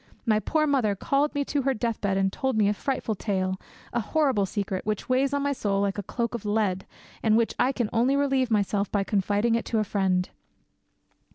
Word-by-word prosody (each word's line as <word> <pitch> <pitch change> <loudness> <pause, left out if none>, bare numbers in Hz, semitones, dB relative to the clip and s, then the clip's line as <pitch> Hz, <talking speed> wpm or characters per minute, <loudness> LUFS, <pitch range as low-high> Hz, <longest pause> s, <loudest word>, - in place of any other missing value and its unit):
My 215 -3 +3
poor 310 +7 +1
mother 255 -9 +2
called 280 +9 0
me 285 0 0
to 285 0 0
her 270 0 0
deathbed 215 -4 -1
and 195 0 +1
told 265 -4 -1
me 210 -2 +4
a 205 - +2
frightful 260 0 -2
tale, 190 -2 -2 0.3
a 240 - +1
horrible 245 -4 +1
secret, 195 -2 -3
which 215 -1 -3
weighs 265 +2 +2
on 285 0 0
my 285 0 +1
soul 200 -6 -1
like 200 0 0
a - - 0
cloak 235 +4 -3
of 235 - -4
lead, 205 -3 0 0.3
and 220 -1 +3
of - - +5
which 230 -1 +1
I 255 - +3
can 245 -5 -1
only 245 +4 +3
relieve 270 -3 +1
myself 205 -2 0
by 200 -1 +1
confiding 205 +3 +1
it 230 - 0
to 225 - -1
a 215 - +2
friend. 190 -3 0
220 Hz, 215 wpm, -26 LUFS, 200-265 Hz, 0.3 s, of